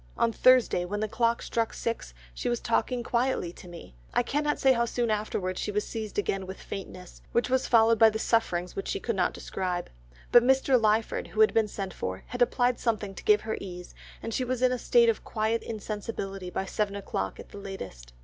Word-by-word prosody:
On 230 Hz, -, +2 dB
Thursday, 255 Hz, -6 st, +4 dB
when 205 Hz, +4 st, -3 dB
the 215 Hz, -, 0 dB
clock 235 Hz, +2 st, +1 dB
struck 230 Hz, -1 st, -1 dB
six, 230 Hz, -, -4 dB, 0.2 s
she -, -, -3 dB
was 240 Hz, -1 st, 0 dB
talking 240 Hz, +1 st, 0 dB
quietly 235 Hz, -8 st, 0 dB
to 180 Hz, -, -13 dB
me. 170 Hz, -, -11 dB, 0.2 s
I -, -, +4 dB
cannot 295 Hz, +3 st, 0 dB
say 265 Hz, -1 st, +5 dB
how 235 Hz, -1 st, +1 dB
soon 235 Hz, -1 st, -1 dB
afterwards 205 Hz, -3 st, -2 dB
she -, -, -2 dB
was 210 Hz, +1 st, -1 dB
seized 220 Hz, -2 st, -6 dB
again 195 Hz, -2 st, -1 dB
with 190 Hz, -, -7 dB
faintness, 185 Hz, -2 st, -8 dB
which 240 Hz, +1 st, +1 dB
was 260 Hz, 0 st, +2 dB
followed 230 Hz, -1 st, +5 dB
by 225 Hz, -1 st, +8 dB
the 220 Hz, -, -3 dB
sufferings 180 Hz, -6 st, 0 dB
which 195 Hz, -, -4 dB
she -, -, -2 dB
could 230 Hz, -, -2 dB
not 180 Hz, -2 st, +2 dB
describe, 180 Hz, -, -4 dB, 0.4 s
but 240 Hz, -, +8 dB
Mr. 265 Hz, 0 st, +3 dB
Lyford 220 Hz, +1 st, +1 dB
who -, -, 0 dB
had 435 Hz, -, +5 dB
been 225 Hz, -1 st, +3 dB
sent 195 Hz, -2 st, -5 dB
for, 95 Hz, 0 st, -5 dB
had 245 Hz, -, -5 dB
applied 245 Hz, 0 st, +2 dB
something 215 Hz, -4 st, -1 dB
to -, -, -10 dB
give 210 Hz, 0 st, +4 dB
her 220 Hz, -, -3 dB
ease, 180 Hz, -2 st, -8 dB, 0.3 s
and 225 Hz, -, -4 dB
she 255 Hz, -, 0 dB
was 250 Hz, 0 st, -2 dB
in 255 Hz, -, +5 dB
a 250 Hz, -, -1 dB
state 235 Hz, 0 st, +4 dB
of 230 Hz, -, +1 dB
quiet 220 Hz, +1 st, -1 dB
insensibility 205 Hz, -3 st, -5 dB
by 190 Hz, -, -3 dB
seven 200 Hz, +1 st, -2 dB
o'clock 95 Hz, -, -4 dB
at -, -, -10 dB
the 205 Hz, -, -9 dB
latest. 95 Hz, -, -8 dB
220 Hz, 215 wpm, -28 LUFS, 195-235 Hz, 0.4 s, by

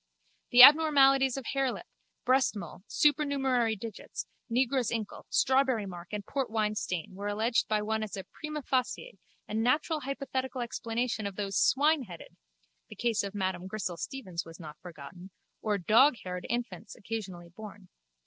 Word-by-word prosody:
The 245 Hz, +1 st, +9 dB
abnormalities 275 Hz, -3 st, +7 dB
of 270 Hz, -, -5 dB
harelip, 270 Hz, -2 st, -1 dB, 0.4 s
breastmole, 240 Hz, -, 0 dB
supernumerary 270 Hz, -6 st, +2 dB
digits, 220 Hz, 0 st, -7 dB, 0.2 s
negro's 250 Hz, 0 st, +1 dB
inkle, 220 Hz, -3 st, -5 dB
strawberry 260 Hz, -4 st, +2 dB
mark 175 Hz, -2 st, -8 dB
and 210 Hz, -1 st, -4 dB
portwine 220 Hz, -6 st, -1 dB
stain 180 Hz, -4 st, -4 dB
were 200 Hz, +2 st, -5 dB
alleged 220 Hz, +3 st, +1 dB
by 215 Hz, -1 st, 0 dB
one 220 Hz, +1 st, -1 dB
as 215 Hz, -2 st, -5 dB
a 190 Hz, -, -5 dB
prima 305 Hz, +5 st, -7 dB
facie 260 Hz, -, -2 dB, 0.3 s
and 215 Hz, +1 st, -2 dB
natural 295 Hz, +6 st, +1 dB
hypothetical 265 Hz, -2 st, -4 dB
explanation 230 Hz, -2 st, -2 dB
of 200 Hz, -, -7 dB
those 200 Hz, -1 st, -3 dB
swineheaded 270 Hz, -, +1 dB, 0.5 s
(the -, -, -10 dB
case 230 Hz, -3 st, 0 dB
of 200 Hz, 0 st, -6 dB
Madame 185 Hz, -2 st, -2 dB
Grissel 190 Hz, -3 st, -4 dB
Steevens 185 Hz, -7 st, -5 dB
was 165 Hz, +1 st, -13 dB
not 155 Hz, -3 st, -10 dB
forgotten) 175 Hz, +2 st, -11 dB, 0.3 s
or 210 Hz, -2 st, 0 dB
doghaired 200 Hz, -, +2 dB
infants 235 Hz, -7 st, -4 dB
occasionally 190 Hz, -6 st, -6 dB
born. 205 Hz, 0 st, -11 dB
225 Hz, 140 wpm, -29 LUFS, 195-265 Hz, 0.5 s, The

